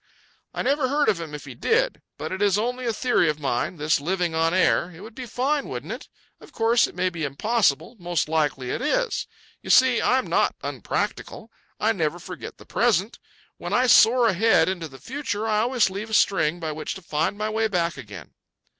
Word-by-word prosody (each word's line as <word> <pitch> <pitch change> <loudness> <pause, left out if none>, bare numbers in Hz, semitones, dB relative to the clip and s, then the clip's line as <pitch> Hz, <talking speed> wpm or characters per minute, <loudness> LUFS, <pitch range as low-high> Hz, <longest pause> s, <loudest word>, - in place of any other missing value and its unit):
"I - - -3
never 275 +1 +1
heard 290 +2 +2
of 170 - 0
him 155 -3 -6
if 145 - -9
he 135 - -8
did. - - 0 0.2
But - - -5
it 190 +1 -4
is 205 -1 +3
only 245 +3 -2
a - - +2
theory 225 -7 +2
of 150 0 -2
mine, 135 +3 -1
this 150 -1 +1
living 175 +1 -1
on 165 0 +2
air. 180 -1 +2
It 175 0 -13
would 220 +2 -10
be 255 +1 -7
fine, 275 +5 -1
wouldn't - - -5
it? - - -10 0.3
Of - - -15
course 230 +1 +3
it - - -13
may 185 0 0
be 170 -3 -5
impossible—most 175 - 0
likely 150 -5 -1
it - - -3
is. - - 0 0.3
You - - -10
see, 255 -2 +5
I 255 - +3
am 260 - -1
not - - +1
unpractical. 225 0 -4 0.3
I 220 - +2
never 165 -5 -1
forget 180 0 -9
the - - -15
present. 220 -3 +1 0.4
When - - -5
I 250 - +3
soar 240 0 +6
ahead 220 +2 +3
into 180 -3 -3
the 135 -3 -13
future, 230 - -4
I 210 -1 +2
always 240 +1 +2
leave 205 +4 -5
a 220 - 0
string 175 -5 +2
by 160 -2 -3
which 155 +5 -5
to 190 - -10
find 160 +5 -1
my 215 +1 -2
way 220 0 +1
back 170 -5 -1
again." 105 - -10
195 Hz, 210 wpm, -24 LUFS, 160-235 Hz, 0.4 s, soar